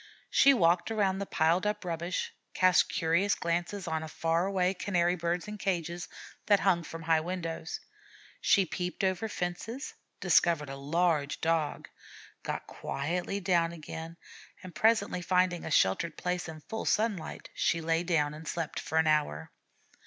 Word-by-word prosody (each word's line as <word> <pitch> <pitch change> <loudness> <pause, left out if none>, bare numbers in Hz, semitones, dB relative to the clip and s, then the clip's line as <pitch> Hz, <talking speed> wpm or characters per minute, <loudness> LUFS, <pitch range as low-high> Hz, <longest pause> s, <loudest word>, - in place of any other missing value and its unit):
She 275 - +7
walked 175 -7 +3
around 200 -3 +1
the 200 - -3
piled 170 +5 +2
up 210 -2 -2
rubbish, 170 +1 -3 0.2
cast 185 -1 +4
curious 170 +5 +2
glances 175 +3 -2
on 160 -1 -2
far 165 +3 0
away 190 -1 +1
Canary 175 -2 +1
birds 170 +1 -2
in 210 0 -7
cages 175 -3 -2 0.4
that 205 -2 +5
hung 185 -3 +3
from 165 0 -8
high 160 -1 +3
windows; 165 -2 -4 0.6
she 195 -2 +4
peeped 180 +2 -4
over 190 +3 +1
fences, 210 +9 -4 0.3
discovered 150 -5 +3
a - - -5
large 150 +1 0
Dog, 160 -2 0 0.5
got - - -4
quietly 175 +7 -3
down 170 -3 +2
again, 165 +1 -8 0.5
and 185 -1 -9
presently 215 -5 +2
finding 180 -1 +1
a - - -4
sheltered 150 - +2
place 180 -1 -2
in 155 -1 -9
full 220 +8 -5
sunlight, 210 -7 -1
she 165 - +1
lay 165 0 +1
down 155 -4 +1
and 155 +1 -10
slept 165 -1 -3
for 160 - -3
an 160 - +4
hour. 150 - +1
170 Hz, 150 wpm, -30 LUFS, 160-185 Hz, 0.6 s, She